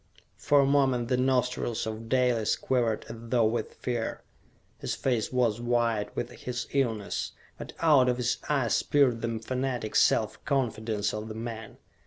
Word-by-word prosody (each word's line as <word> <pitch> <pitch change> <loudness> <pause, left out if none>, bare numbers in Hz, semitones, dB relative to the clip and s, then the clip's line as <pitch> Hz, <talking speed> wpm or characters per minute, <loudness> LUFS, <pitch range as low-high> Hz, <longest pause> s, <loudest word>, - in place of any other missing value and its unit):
For 145 -1 +4
a - - +3
moment 135 -4 +2
the 130 - +3
nostrils 125 -3 0
of 110 +1 -6
Dalis 125 -4 +2
quivered 120 -4 0
as 115 - -7
though 115 0 +1
with 115 +2 -1
fear. 120 -2 -3 0.6
His - - -3
face 120 -5 -1
was 120 -3 +1
white 120 -3 +1
with - - -3
his 120 -1 -5
illness; 115 -7 -1 0.3
but - - -8
out 145 -6 +5
of 125 - +1
his 125 -1 0
eyes 135 -6 +2
peered 130 -5 +2
the 115 -1 -2
fanatic 125 -1 -3
self 110 - +2
confidence 110 -7 -1
of 105 +1 -4
the 110 - -7
man. 110 -1 -6
120 Hz, 160 wpm, -28 LUFS, 110-130 Hz, 0.6 s, out